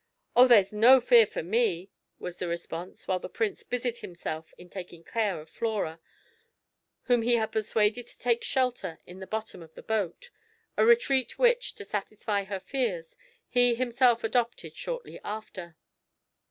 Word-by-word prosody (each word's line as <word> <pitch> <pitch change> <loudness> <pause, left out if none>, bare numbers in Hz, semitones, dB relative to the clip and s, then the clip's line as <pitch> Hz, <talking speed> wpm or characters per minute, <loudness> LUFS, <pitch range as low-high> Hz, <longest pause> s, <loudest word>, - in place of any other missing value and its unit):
"Oh, 250 +2 +8
there's 210 -5 +5
no 240 +5 +7
fear 235 -2 +6
for - - -5
me!" 195 -2 0 0.3
was 180 -1 -7
the 180 - -3
response, 170 +1 -6
while 185 -1 0
the - - -7
Prince 225 -3 -2
busied 245 -1 -3
himself 160 -2 -6
in 180 - -13
taking 180 -2 -9
care 210 -6 -1
of 155 - -12
Flora, 205 -6 -3 1.0
whom 245 -2 +3
he 240 +1 +3
had 220 -2 0
persuaded 220 +2 0
to - - -11
take 235 -1 0
shelter 245 -10 -1
in 180 +1 -11
the 190 - -8
bottom 220 -2 -5
of 160 -1 -15
the - - -11
boat, 220 - -3 0.4
a - - +3
retreat 440 - +3
which, - - +2
to 200 - -9
satisfy 205 0 -3
her 195 0 -4
fears, 190 -6 -3 0.3
he 245 -1 +4
himself 245 -1 +2
adopted 235 +1 -1
shortly - - -6
after. 190 -5 -7
220 Hz, 160 wpm, -28 LUFS, 185-245 Hz, 1.0 s, Oh